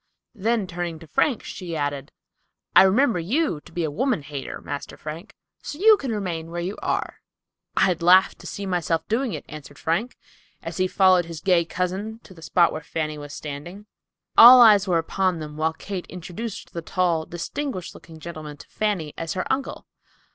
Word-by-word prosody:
Then 225 0 0
turning 175 -2 -4
to 165 - -13
Frank, 230 - 0
she 175 -3 -6
added, 145 -2 -3 0.6
"I - - +10
remember 210 +2 +3
you 200 - 0
to - - -16
be 175 - -2
a 155 - -1
woman 230 - 0
hater, 140 -1 -6
master 145 -1 -7
Frank, 160 +7 -8 0.3
so 290 - -7
you 430 +5 +7
can 275 - -4
remain 175 -6 -3
where 175 +1 -5
you 180 +4 -3
are." - - -2 0.6
"I'd 180 -3 +2
laugh 185 +2 +6
to - - -10
see 200 - -5
myself 170 -3 -1
doing 235 +1 0
it," - - -6
answered 145 -1 -11
Frank, 200 +10 -2 0.5
as - - -6
he 185 0 +2
followed 185 -2 +4
his 165 -2 -7
gay 180 -2 +3
cousin 190 +6 -3
to 190 - -14
the 165 - -15
spot 170 +1 +3
where 155 - -5
Fanny 155 -1 -4
was 145 0 -9
standing. 155 +8 -8 0.5
All 250 +2 +11
eyes 210 -4 +7
were 175 -2 +2
upon 185 +2 0
them, 150 -1 -7
while 160 +1 0
Kate 185 +2 -6
introduced 185 +5 -7
the 170 - -4
tall, 170 -2 0
distinguished 180 - -5
looking 160 -1 -13
gentleman 155 -3 -8
to - - -14
Fanny 190 -9 -2
as 165 -1 -3
her 185 - -2
uncle. 270 +1 -4
175 Hz, 185 wpm, -24 LUFS, 160-205 Hz, 0.6 s, All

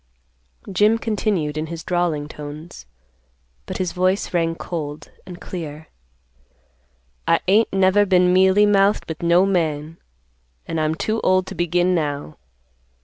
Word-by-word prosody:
Jim 210 +4 +3
continued, 200 -9 -1
in 155 - -3
his 165 0 -7
drawling 175 -5 -1
tones, 150 - -10 0.8
but - - -4
his 185 -2 -2
voice 185 +2 0
rang 165 -1 +1
cold 155 -4 -6 0.2
and 180 -1 -9
clear, 155 -3 -7 1.4
"I - - +4
ain't 210 +4 +3
never 195 +1 +3
been 180 -1 +4
mealy 190 +2 +5
mouthed 200 0 +3
with 160 0 -6
no 170 +2 +4
man, 160 -4 -1 0.7
and 165 -1 -2
I'm 155 +1 0
too 220 +6 -2
old 185 0 +2
to - - -8
begin 175 +1 +1
now. 145 - -3
175 Hz, 135 wpm, -21 LUFS, 155-190 Hz, 1.4 s, mealy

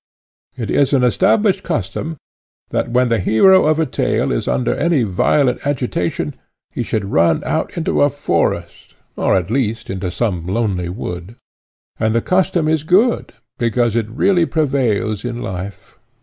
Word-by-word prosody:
It 115 -5 -4
is 140 0 +2
an 130 -2 +3
established 190 - +2
custom, 145 - -3 0.5
that - - -1
when 125 +1 +2
the 115 -1 +1
hero 150 - +5
of 155 0 +2
a 160 - +2
tale 130 - -1
is - - -2
under 60 -1 0
any 155 - +1
violent 125 +7 +1
agitation, 125 -10 -2 0.4
he - - -4
should 105 -3 -2
run 85 -1 +2
out - - -2
into 75 - 0
a 70 - +5
forest, - - -2 0.2
or, - - +1
at 95 +1 -1
least, 115 -3 -1
into 95 -1 -3
some 90 -5 -2
lonely 95 -4 -1
wood; 90 +1 -6 0.6
and 110 +1 +1
the 115 - +2
custom 180 -3 +1
is 160 -1 +1
good, 190 - +2 0.3
because 120 -1 +1
it 115 -2 -1
really 170 - +2
prevails 120 - 0
in 120 -1 -4
life. 95 -1 -7
115 Hz, 155 wpm, -18 LUFS, 95-145 Hz, 0.6 s, hero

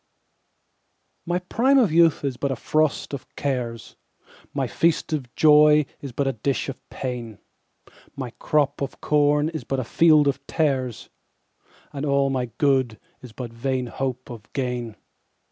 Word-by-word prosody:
1My 180 +1 -2
prime 265 +7 +3
of 230 -10 +4
youth 165 -2 +4
is 135 -2 -1
but 140 +3 -2
a - - -1
frost 155 +4 0
of 140 - -6
cares,2My 120 -5 -5
feast 165 -1 0
of 130 -6 -3
joy 150 -1 +6 0.2
is 140 - -6
but 140 +4 -1
a 135 - 0
dish 130 +5 -2
of 135 - -10
pain,3My 125 +1 -9
crop 145 -2 +1
of 140 - -4
corn 150 0 +2
is 160 -2 -6
but 135 - -2
a - - -1
field 155 +3 +4
of 140 0 0
tares,4And 135 0 -5
all 140 0 +2
my 125 -2 -1
good 130 -6 +1 0.2
is 125 - -11
but 115 0 -7
vain 130 +2 -2
hope 130 +1 -4
of 115 -1 -11
gain. 125 -4 -3
135 Hz, 145 wpm, -24 LUFS, 125-150 Hz, 0.2 s, joy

